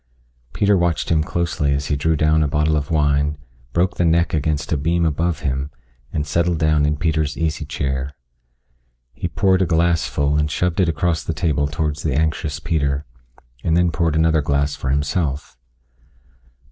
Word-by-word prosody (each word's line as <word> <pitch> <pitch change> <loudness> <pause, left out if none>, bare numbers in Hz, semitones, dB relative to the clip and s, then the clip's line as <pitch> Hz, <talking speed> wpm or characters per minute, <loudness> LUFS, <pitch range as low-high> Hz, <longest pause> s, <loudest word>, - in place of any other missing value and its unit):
Peter 100 0 +2
watched 85 -3 0
him 80 -2 +2
closely 85 -4 -1
as 70 +1 -2
he 75 - 0
drew 80 +3 +1
down 75 +1 +3
a 75 - +2
bottle 75 +2 +1
of 75 -2 -2
wine, 75 -1 +1 0.3
broke 90 +5 0
the - - +2
neck 85 +1 +2
against 75 -1 -1
a - - +3
beam 85 +4 +1
above 80 +1 0
him, 70 0 -2 0.4
and 75 -2 -2
settled 85 +3 0
down 75 -2 +2
in 75 0 0
Peter's 80 -2 0
easy 80 -1 -2
chair. 70 -2 -2 1.0
He - - -4
poured 95 -1 +2
a 95 - +2
glass 85 0 +2
full 70 +1 0
and 75 0 0
shoved 90 +3 -1
it 90 -3 +3
across 80 0 0
the 80 - -3
table 70 -1 0
towards 75 -1 -2
the 75 -5 -1
anxious 80 -1 -1
Peter, 70 -4 -1 0.6
and 85 0 +2
then 90 -1 +3
poured 80 -1 0
another 80 -1 +3
glass 70 0 0
for 65 - -4
himself. 75 +1 -1
80 Hz, 175 wpm, -20 LUFS, 75-85 Hz, 1.0 s, down